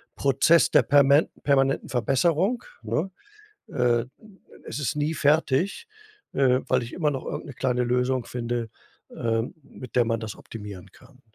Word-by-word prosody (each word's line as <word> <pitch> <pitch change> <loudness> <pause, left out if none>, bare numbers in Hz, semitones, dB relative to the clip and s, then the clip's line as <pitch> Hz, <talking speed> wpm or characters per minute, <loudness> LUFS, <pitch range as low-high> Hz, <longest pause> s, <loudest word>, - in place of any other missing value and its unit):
Prozess 140 +5 +4
der - - +5
permen 140 +1 +5 0.2
permanenten 135 -1 +2
Verbesserung, 165 - +1 0.2
ne? 155 - -1 0.6
Äh, 120 -3 +1 0.6
es - - -6
ist 140 -6 -1
nie 150 +2 -1
fertig, 155 - +1 0.5
äh, 130 -1 +3
weil 130 -2 +2
ich 115 - -10
immer 155 -4 0
noch 135 -2 -5
irgend - - -5
'ne 140 - -8
kleine 125 0 0
Lösung 125 +1 0
finde, 120 -2 -4 0.5
ähm, 115 +5 -1
mit 130 -3 -11
der 120 - +5
man 115 0 -1
das 110 -1 -6
optimieren 100 -4 -10
kann. 130 0 -20
130 Hz, 150 wpm, -25 LUFS, 120-145 Hz, 0.6 s, der